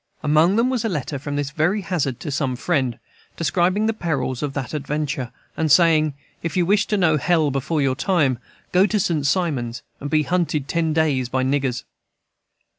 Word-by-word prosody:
Among 155 +5 +4
them 240 +3 +2
was 250 -4 -1
a 225 - 0
letter 145 -4 -3
from 145 +1 -5
this 145 -1 -2
very 175 +7 +1
Hazard 155 -9 -2
to 150 - -4
some 140 -2 -1
friend, 130 -4 0 0.4
describing 180 +5 +1
the 225 - +1
perils 140 - -2
of 145 -2 -2
that 140 0 -4
adventure, 145 -3 -3 0.2
and 160 -2 0
saying, 155 -2 +4 0.3
"If 165 +1 -3
you 175 - +3
wish 205 +3 +2
to 210 - 0
know 160 -5 +3
hell 155 0 +2
before 140 +3 -1
your 130 -1 +1
time, 145 - +1 0.3
go 185 +3 +4
to 210 0 0
St 155 -6 0
Simon's 135 -9 -1 0.2
and 145 - -5
be 155 0 +2
hunted 160 -5 -1
ten 165 -1 0
days 150 -6 +1
by 130 0 0
niggers." 135 -2 0
155 Hz, 190 wpm, -22 LUFS, 135-175 Hz, 0.4 s, Among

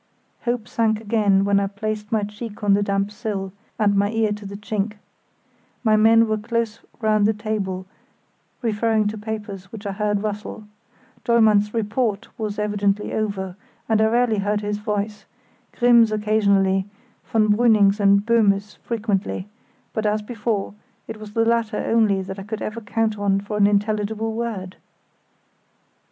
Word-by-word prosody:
Hope 240 -2 -1
sank 220 -2 +1
again 205 -3 +2
when 200 0 +3
I 200 - 0
placed 210 +1 -4
my 220 -2 +1
cheek 210 +1 -7
on 205 -1 +4
the 200 - +3
damp 200 0 0
sill, 205 -4 -4 0.2
and 205 -2 +2
my 200 +1 +2
ear 225 -1 +1
to 210 -1 -5
the 200 0 -7
chink. 210 0 -2 0.9
My 215 -2 +4
men 225 +1 +5
were 215 0 0
close 230 0 -2 0.2
round 215 -2 +3
the 220 - +1
table 205 -4 -3 0.8
referring 220 -1 +1
to 215 - -6
papers 205 -3 -6
which 220 -2 -9
I 200 - -2
heard 205 0 -1
rustle. 210 0 -4 0.6
Dollmann's 215 -3 +4
"report" 215 -1 -1
was 210 -2 -3
evidently 205 -1 0
over, 195 -4 -2 0.3
and 220 -1 +2
I - - +5
rarely 235 -1 +2
heard 205 +1 0
his 205 0 -2
voice; 210 0 -3 0.5
Grimm's 235 -2 +5
occasionally, 200 -3 +2 0.4
von 215 -1 +2
Brüning's 215 -3 +4
and 200 0 +4
Böhme's 210 -3 +2
frequently; 210 -4 -2 0.5
but, 220 -1 0
as 210 0 0
before, 210 -3 -2 0.3
it 225 - -6
was 210 -1 -10
the 225 0 +2
latter 230 -1 +1
only 210 -4 +2
that 190 +1 -7
I - - -6
could 215 +2 -5
ever 230 +2 -4
count 220 -1 -1
on 200 -1 +2
for 205 +1 -5
an 200 -1 +5
intelligible 210 +2 0
word. 215 -5 -4
210 Hz, 155 wpm, -22 LUFS, 200-220 Hz, 0.9 s, men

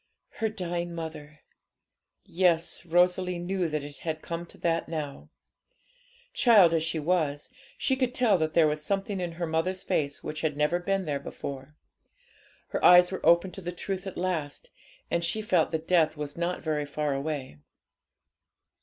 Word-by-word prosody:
Her 220 -1 +1
dying 175 -4 -4
mother! 150 -2 -7 0.8
Yes, 170 -2 +1
Rosalie 180 +1 +2
knew 180 +1 -1
that 150 -2 -2
it 145 0 -8
had 160 -1 -4
come 170 0 -5
to - - -12
that 165 -1 -1
now. 150 -4 -5 1.0
Child 215 - +6
as 165 - +2
she 160 0 -2
was, 155 - 0 0.3
she 265 - +1
could 255 -1 -1
tell 240 -6 +4
that 155 0 -1
there 165 - +6
was 150 0 0
something 195 +2 -1
in 175 -2 -3
her 170 +1 -3
mother's 165 +4 -1
face 140 -1 -1
which 155 0 -5
had 150 -3 -1
never 150 +4 +2
been 195 +1 -1
there 145 -2 -1
before. 140 +2 -7 0.9
Her - - -3
eyes 180 0 +8
were 190 - -5
opened 170 +2 +4
to 195 - -8
the 175 0 -4
truth 190 +2 -4
at 190 - -7
last, 170 -5 -3 0.4
and 170 - +1
she 170 +6 0
felt 185 -7 +2
that 160 0 -4
death 165 -4 +3
was 145 -1 -5
not 175 +1 -2
very 150 -2 -1
far 150 0 -1
away. 135 - -4
170 Hz, 170 wpm, -28 LUFS, 155-180 Hz, 1.0 s, eyes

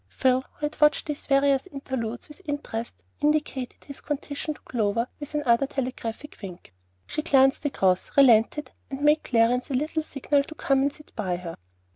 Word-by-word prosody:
Phil, 260 0 +2
who 300 - -4
had 295 - -5
watched 300 0 +4
these 295 -2 -5
various 275 +1 +3
interludes 260 -7 -4
with 300 +5 -11
interest, 230 - -5 0.2
indicated 295 -4 -1
his 280 - -10
condition 295 +1 -4
to - - -17
Clover 230 0 0
with 295 0 -7
another 275 -2 +3
telegraphic 260 -1 -5
wink. 180 - -9 0.3
She 305 - -3
glanced 270 -3 +4
across, 190 -9 +1
relented, 260 +2 +5 0.2
and 270 0 -5
made 300 +1 +5
Clarence 245 +2 +2
a 270 - -1
little 305 +4 0
signal 285 -1 0
to 315 - -10
come 275 -3 +2
and 280 +1 +2
sit 300 +1 -14
by 185 -5 -1
her. 175 -2 -6
275 Hz, 170 wpm, -26 LUFS, 235-295 Hz, 0.3 s, relented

